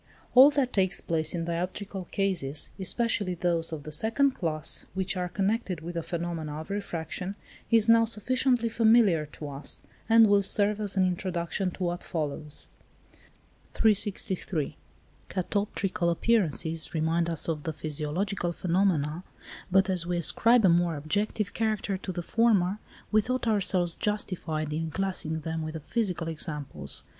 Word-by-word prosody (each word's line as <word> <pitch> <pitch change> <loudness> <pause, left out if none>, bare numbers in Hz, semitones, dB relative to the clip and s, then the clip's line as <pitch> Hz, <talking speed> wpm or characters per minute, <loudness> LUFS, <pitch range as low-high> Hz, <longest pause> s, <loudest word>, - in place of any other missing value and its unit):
All 260 +3 +9
that 275 -3 0
takes 190 -1 +2
place 160 0 -1
in 165 -1 -2
dioptrical 180 +2 -4
cases, 175 -8 -1
especially 200 -1 0
those 170 -1 0
of 155 -3 -5
the 155 - -7
second 225 - +2
class 160 -10 0
which 190 +1 0
are 180 -1 -2
connected 195 -2 -1
with 170 +2 -6
the 170 - -2
phenomena 165 -2 -4
of 160 +5 -8
refraction, 185 -1 -4 0.3
is 225 -2 +4
now 230 0 +6
sufficiently 245 +2 +1
familiar 220 -8 +4
to 150 0 -9
us, 140 +1 -3 0.3
and 225 0 +8
will 205 -1 +4
serve 205 +1 +1
as 200 -2 -1
an 190 - +4
introduction 180 0 -1
to 180 - -6
what 175 0 -2
follows. 150 -2 -3 1.1
363. 190 -6 0 0.5
Catoptrical 190 -1 -1
appearances 170 -5 +1
remind 165 +2 +1
us 165 -2 -3
of 160 -3 -2
the 160 - -3
physiological 155 +5 -2
phenomena, 170 -3 0 0.5
but 195 +1 +4
as 180 -3 -1
we 175 0 0
ascribe 225 +7 +4
a - - +6
more 170 -1 +3
objective 200 +6 -2
character 215 -3 -1
to 190 0 -5
the 175 -1 -4
former, 210 -2 +2 0.3
we 215 0 +5
thought 255 +2 -2
ourselves 185 -5 +2
justified 170 -7 -2
in 160 +1 -2
classing 160 -3 -2
them 160 +1 -3
with 155 0 -5
the - - -3
physical 180 - -2
examples. 150 -3 -5
180 Hz, 150 wpm, -28 LUFS, 165-205 Hz, 1.1 s, All